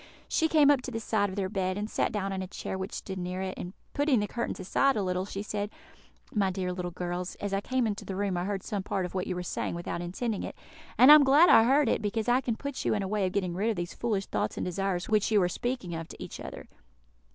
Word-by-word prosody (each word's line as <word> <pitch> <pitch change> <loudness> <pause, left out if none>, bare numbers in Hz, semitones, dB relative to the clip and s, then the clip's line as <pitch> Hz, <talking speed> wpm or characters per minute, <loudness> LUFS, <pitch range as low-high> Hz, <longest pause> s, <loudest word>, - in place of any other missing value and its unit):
She 320 - +2
came 300 -3 +6
up 280 -3 +3
to 260 - -5
the 225 -2 -3
side 215 -2 0
of 190 - -7
their 195 -2 -1
bed, 185 -1 -1
and 210 +1 -2
sat - - 0
down 195 -2 -2
in 190 - -3
a 185 - -4
chair 190 - -5
which 190 +1 -4
stood 190 -1 -5
near 180 +1 -3
it, 190 0 -3
and 180 - -6 0.2
putting 285 -4 +3
the 205 - 0
curtains 235 +3 -3
aside 270 +9 +2
a 210 - 0
little, 185 0 -1
she 200 0 -5
said, 210 -1 -3 0.6
"My 200 -3 +2
dear 180 -1 -2
little 180 -1 -3
girls, 175 +1 -4
as 205 -1 -4
I 195 - +1
came 255 +3 0
into 210 -2 -2
the 190 - -5
room 200 -1 -1
I 175 +1 -1
heard 195 -1 -2
some 205 -4 -3
part 190 -1 -2
of 180 - -7
what 185 -1 -2
you 185 - -2
were 180 - -3
saying 175 - -3
without 170 0 -4
intending 200 +5 -3
it; - - -6 0.4
and 260 +3 +9
I - - +13
am 300 -1 +9
glad 290 +6 +6
I 225 - +8
heard 275 +2 +4
it, - - +1
because 215 +2 -2
I 245 +2 +4
can 235 -3 -1
put 280 +2 -5
you - - +1
in 205 - -1
a - - -2
way 205 -1 0
of - - -3
getting 185 -4 0
rid 200 +6 0
of 225 - 0
these 175 -1 -4
foolish 210 -5 -1
thoughts - - -2
and - - -2
desires 180 0 -1
which 215 -2 +2
you 215 -2 +4
are - - +3
speaking 240 -1 -3
of 165 0 -5
to - - -9
each - - -8
other. - - -8
200 Hz, 285 wpm, -29 LUFS, 185-225 Hz, 0.6 s, I